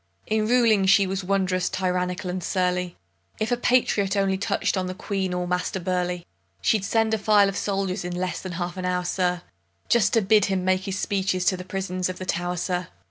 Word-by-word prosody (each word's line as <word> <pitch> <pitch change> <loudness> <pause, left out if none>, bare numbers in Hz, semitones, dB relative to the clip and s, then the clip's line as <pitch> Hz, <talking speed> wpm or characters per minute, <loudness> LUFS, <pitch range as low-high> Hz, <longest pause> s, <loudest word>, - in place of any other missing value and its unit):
In 215 0 0
ruling 225 -5 +4
she 195 +1 +6
was 190 0 -3
wonderous 185 -1 0
tyrannical 180 0 -1
and 180 -1 -4
surly; 180 -1 -1 0.4
If 215 +2 -1
a - - +4
patriot 225 -5 +2
only 195 -1 +2
touch'd 205 +1 0
on 185 -1 -1
the 185 - -5
Queen 195 -2 -2
or 180 0 -2
Master 180 +1 -1
Burleigh, 180 -1 -2 0.4
She'd 215 -3 +2
send 225 +2 +1
a 220 - +1
file 205 -1 +5
of 195 - -3
soldiers 195 -1 -1
in 175 0 -4
less 180 -1 -3
than 185 -1 -6
half 175 +1 -4
an 185 - -3
hour, 180 0 0
sir, 180 -1 0 0.5
Just 225 -2 +3
to 225 -3 +3
bid 210 +1 +4
him 190 -2 -1
make 185 0 +1
his 195 -1 -3
speeches 190 -3 0
to 185 - +3
the 180 - -7
prisons 185 -1 -3
of 185 - -5
the 185 - -6
Tow'r, 175 0 -2
sir! 180 0 -2
185 Hz, 210 wpm, -24 LUFS, 180-200 Hz, 0.5 s, she